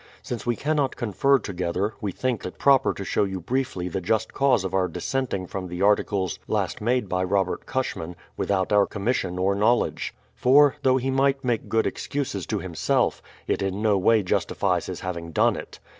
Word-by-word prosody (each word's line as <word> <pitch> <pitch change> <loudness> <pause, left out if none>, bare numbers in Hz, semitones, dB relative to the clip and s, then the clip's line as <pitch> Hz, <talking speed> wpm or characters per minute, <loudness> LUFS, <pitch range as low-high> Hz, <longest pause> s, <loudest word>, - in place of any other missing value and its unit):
Since 120 -1 -5
we 120 - +2
cannot 145 +1 0
confer 130 +5 +2
together, 95 0 -2
we 100 - -2
think 125 +1 -2
it 90 - -6
proper 135 -1 +4
to 100 - -6
show - - +1
you 95 -1 -3
briefly 120 -2 -2
the 95 +2 -3
just 110 +4 0
cause 135 -7 +3
of 95 - -4
our 95 -1 +2
dissenting 105 +1 -2
from 95 +1 -5
the 90 +2 -3
articles 100 -3 +1
last - - -1
made 120 0 +1
by 90 0 0
Robert 95 0 0
Cushman, 90 -10 -3 0.2
without 95 0 0
our 100 -1 +5
commission 100 -4 -1
or 95 +2 +2
knowledge. 110 +4 +1 0.2
For, 140 +2 +5
though 130 -1 +4
he 130 +1 -1
might 135 0 +2
make 120 -3 -1
good 110 0 +2
excuses 115 - -3
to - - -1
himself, 85 -4 0 0.2
it - - -1
in 95 +2 -2
no 105 -2 +4
way 105 +3 +3
justifies 90 - 0
his - - -6
having 85 -2 -5
done - - +3
it. - - -9
105 Hz, 190 wpm, -25 LUFS, 95-130 Hz, 0.2 s, our